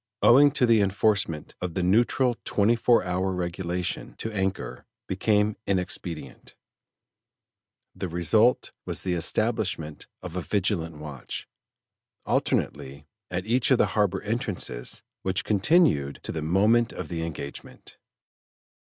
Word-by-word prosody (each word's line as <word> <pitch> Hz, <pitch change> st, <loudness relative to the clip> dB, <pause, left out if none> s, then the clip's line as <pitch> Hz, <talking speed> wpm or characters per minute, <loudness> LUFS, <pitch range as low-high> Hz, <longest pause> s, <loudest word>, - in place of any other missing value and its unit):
Owing 140 Hz, +4 st, +7 dB
to 130 Hz, -, +3 dB
the 115 Hz, -3 st, +4 dB
enforcement 100 Hz, -5 st, 0 dB
of 90 Hz, -2 st, -4 dB
the 95 Hz, -, 0 dB
neutral 120 Hz, +6 st, +3 dB
twenty 105 Hz, +3 st, +2 dB
four 120 Hz, +1 st, +3 dB
hour 95 Hz, +1 st, -1 dB
regulation, 90 Hz, 0 st, -3 dB
to 110 Hz, -, -4 dB
anchor, 95 Hz, -2 st, -3 dB, 0.2 s
became 105 Hz, +2 st, +1 dB
inexpedient; 90 Hz, -4 st, -3 dB, 1.4 s
the -, -, -4 dB
result 105 Hz, +8 st, +3 dB
was -, -, -3 dB
the 90 Hz, -, -1 dB
establishment 80 Hz, -2 st, -1 dB, 0.2 s
of 90 Hz, -1 st, -7 dB
a 90 Hz, -, -1 dB
vigilant 85 Hz, -4 st, -1 dB
watch, 75 Hz, -4 st, -7 dB, 0.8 s
alternately, 70 Hz, +3 st, -1 dB, 0.2 s
at 90 Hz, +1 st, -3 dB
each 120 Hz, +3 st, +2 dB
of 130 Hz, -, +5 dB
the -, -, +4 dB
harbor 100 Hz, -3 st, +1 dB
entrances, 105 Hz, -, -3 dB, 0.2 s
which 95 Hz, 0 st, 0 dB
continued 105 Hz, -, +3 dB
to -, -, -5 dB
the 80 Hz, -, -3 dB
moment 105 Hz, +9 st, +3 dB
of -, -, -6 dB
the 80 Hz, -1 st, -4 dB
engagement. 70 Hz, -3 st, -8 dB
95 Hz, 125 wpm, -26 LUFS, 85-110 Hz, 1.4 s, Owing